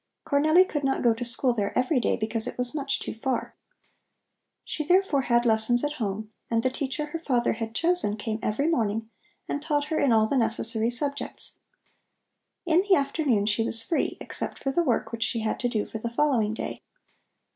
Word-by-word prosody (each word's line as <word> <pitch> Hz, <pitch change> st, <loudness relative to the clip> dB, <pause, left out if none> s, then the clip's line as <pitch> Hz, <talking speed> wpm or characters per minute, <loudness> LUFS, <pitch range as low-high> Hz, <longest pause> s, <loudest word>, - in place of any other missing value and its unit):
Cornelli 310 Hz, +6 st, +5 dB
could 295 Hz, -5 st, -3 dB
not 270 Hz, 0 st, 0 dB
go 235 Hz, -2 st, +5 dB
to 230 Hz, +2 st, -5 dB
school 245 Hz, +1 st, +1 dB
there 205 Hz, -3 st, -2 dB
every 255 Hz, +2 st, +2 dB
day -, -, +1 dB
because 220 Hz, 0 st, 0 dB
it -, -, -5 dB
was 250 Hz, -1 st, 0 dB
much 280 Hz, -2 st, -1 dB
too -, -, -5 dB
far. 255 Hz, +3 st, -3 dB, 1.1 s
She 305 Hz, -, -3 dB
therefore 360 Hz, -3 st, +3 dB
had 240 Hz, -2 st, +2 dB
lessons 225 Hz, +2 st, +3 dB
at 295 Hz, -, 0 dB
home, 210 Hz, +1 st, -3 dB, 0.2 s
and 230 Hz, 0 st, +1 dB
the 255 Hz, -, +1 dB
teacher 275 Hz, +1 st, -3 dB
her 300 Hz, +2 st, -5 dB
father 250 Hz, -7 st, +1 dB
had 225 Hz, 0 st, -5 dB
chosen 340 Hz, -11 st, +1 dB
came 215 Hz, +1 st, -3 dB
every 255 Hz, +8 st, 0 dB
morning 225 Hz, -7 st, 0 dB, 0.4 s
and 285 Hz, -, -2 dB
taught 295 Hz, -1 st, -1 dB
her -, -, +1 dB
in 275 Hz, -, +3 dB
all 220 Hz, -1 st, +5 dB
the 270 Hz, +5 st, 0 dB
necessary 225 Hz, -1 st, +1 dB
subjects. 280 Hz, +4 st, -4 dB, 1.1 s
In 340 Hz, +1 st, +4 dB
the 395 Hz, -1 st, +4 dB
afternoon 275 Hz, -7 st, +1 dB
she 215 Hz, +2 st, +2 dB
was 225 Hz, 0 st, +1 dB
free, 330 Hz, -, -1 dB
except -, -, -5 dB
for 270 Hz, -, -2 dB
the 345 Hz, -, +2 dB
work 250 Hz, -9 st, 0 dB
which 230 Hz, -1 st, -6 dB
she 225 Hz, 0 st, 0 dB
had 220 Hz, -, -1 dB
to 245 Hz, -, 0 dB
do 215 Hz, -3 st, -1 dB
for 220 Hz, -, -6 dB
the 235 Hz, -, -3 dB
following 235 Hz, -4 st, +1 dB
day. -, -, -5 dB
245 Hz, 200 wpm, -26 LUFS, 225-290 Hz, 1.1 s, Cornelli